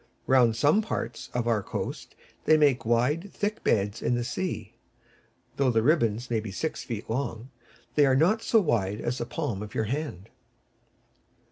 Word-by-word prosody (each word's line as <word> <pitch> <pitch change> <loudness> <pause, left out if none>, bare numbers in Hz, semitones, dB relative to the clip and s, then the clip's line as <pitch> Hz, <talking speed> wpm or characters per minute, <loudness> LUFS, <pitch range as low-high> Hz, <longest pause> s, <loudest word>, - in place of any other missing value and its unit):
Round 125 -4 +4
some 145 - +4
parts 220 - -4
of 120 -1 -2
our 115 -3 +2
coast - - -5 0.3
they 155 - +6
make 140 -6 +3
wide, 145 +11 +1
thick 210 +1 -3
beds 100 -1 +1
in 120 - +1
the 120 - -1
sea. 120 - -4 0.8
Though 140 -2 +3
the 115 -2 +2
ribbons 120 -5 +2
may 115 - +2
be 110 -1 -6
six 160 +11 -3
feet 115 -3 -5
long, 125 0 -3 0.4
they 145 -2 +4
are 130 - +4
not 180 +11 +3
so 225 - +4
wide 105 - 0
as 125 +2 -2
the 120 - -3
palm 125 -8 -3
of 105 -1 -8
your - - +1
hand. 115 - -4
125 Hz, 170 wpm, -27 LUFS, 110-150 Hz, 0.8 s, they